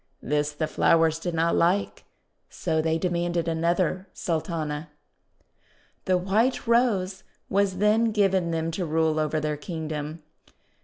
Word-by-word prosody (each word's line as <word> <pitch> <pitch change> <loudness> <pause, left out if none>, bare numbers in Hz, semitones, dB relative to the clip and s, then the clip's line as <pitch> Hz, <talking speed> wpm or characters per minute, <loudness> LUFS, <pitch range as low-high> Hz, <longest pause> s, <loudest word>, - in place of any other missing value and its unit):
This 150 +1 0
the 150 +2 -2
flowers 160 0 +3
did 175 0 -3
not 165 +1 +2
like, 185 +4 +1 0.4
so 160 -2 -1
they 160 0 +1
demanded 175 -1 -1
another 170 +3 0
Sultana. 160 -2 -3 1.2
The 185 -1 +3
White 210 +8 +1
Rose 210 -6 +2 0.3
was 195 -1 +1
then 210 +3 +3
given 195 -5 +2
them 165 0 -1
to 175 +2 -3
rule 160 0 +1
over 155 0 0
their 150 -1 -2
Kingdom. 155 -1 -5
170 Hz, 125 wpm, -26 LUFS, 160-190 Hz, 1.2 s, flowers